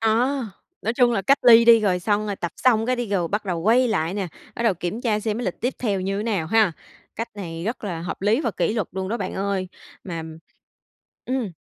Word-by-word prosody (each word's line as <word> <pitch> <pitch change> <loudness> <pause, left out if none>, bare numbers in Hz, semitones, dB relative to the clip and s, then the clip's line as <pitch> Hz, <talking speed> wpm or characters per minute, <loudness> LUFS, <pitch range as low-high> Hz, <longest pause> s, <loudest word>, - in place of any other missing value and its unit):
À, 225 - +2 0.7
nói 225 - 0
chung 245 -2 +4
là 195 - 0
cách 275 +1 +4
ly 235 -1 +8
đi, 230 -1 +7
rồi 185 -4 +1
xong 210 +2 0
rồi 200 -2 -3
tập 175 - -4
xong 230 -3 +3
cái 255 0 +1
đi 240 -3 -3
rồi 180 -5 0
bắt 205 +1 -2
đầu 175 -3 -2
quay 240 +6 +4
lại 180 -3 0
nè, 195 -4 -2 0.3
bắt 235 - -3
đầu 220 -5 +3
kiểm 175 +6 -4
tra 215 -4 0
xem 215 +1 -2
cái 245 - -3
lịch 185 - -4
tiếp 250 +2 -1
theo 205 -6 0
thì 185 - -4
như 195 +1 -1
thế 205 - -2
nào 200 -8 -1
ha? 215 -3 +3 0.4
Cách 230 +2 -3
này 165 -4 -6
rất 225 +1 -3
là 175 -5 -4
hợp 180 - -5
lý 220 +7 +3
và - - -1
kỷ - - 0
luật 215 -6 -1
luôn 190 0 -3
đó 230 - -1
bạn 190 -5 -4
ơi, 195 -1 -2 0.4
mà 165 -4 -5 1.0
ừm. 250 -8 -2
210 Hz, 250 wpm, -23 LUFS, 185-230 Hz, 1.0 s, ly